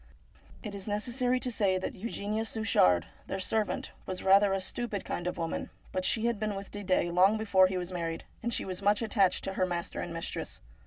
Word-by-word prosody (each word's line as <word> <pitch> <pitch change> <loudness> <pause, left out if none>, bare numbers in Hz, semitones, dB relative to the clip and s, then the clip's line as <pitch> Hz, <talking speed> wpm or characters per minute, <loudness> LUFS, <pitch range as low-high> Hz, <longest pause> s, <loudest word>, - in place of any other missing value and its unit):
It 210 -3 -5
is 200 0 -6
necessary 245 +4 0
to 250 0 -1
say 195 -5 +2
that 185 - -3
Eugenia 215 +1 -2
Suchard, 90 - +3 0.2
their 195 - -3
servant, 210 +2 -1 0.2
was 185 -1 -4
rather 195 +1 +6
a. 195 - +1
stupid 205 +1 -3
kind 175 - -3
of 180 - -2
woman; 165 -1 -3 0.2
but 185 0 -1
she 225 - +2
had 235 -3 +1
been 215 -1 -1
with 195 0 -7
Didet 185 -4 0
long 190 +4 +5
before 195 -4 +5
he 185 0 -2
was 180 0 -4
married, 165 -2 -3 0.2
and 235 - -1
she - - -1
was 185 0 -4
much 205 +3 +3
attached 200 -4 +2
to 195 - -2
her 185 -1 +1
master 175 -1 -3
and 175 - -5
mistress. 165 0 -4
195 Hz, 210 wpm, -30 LUFS, 185-215 Hz, 0.2 s, rather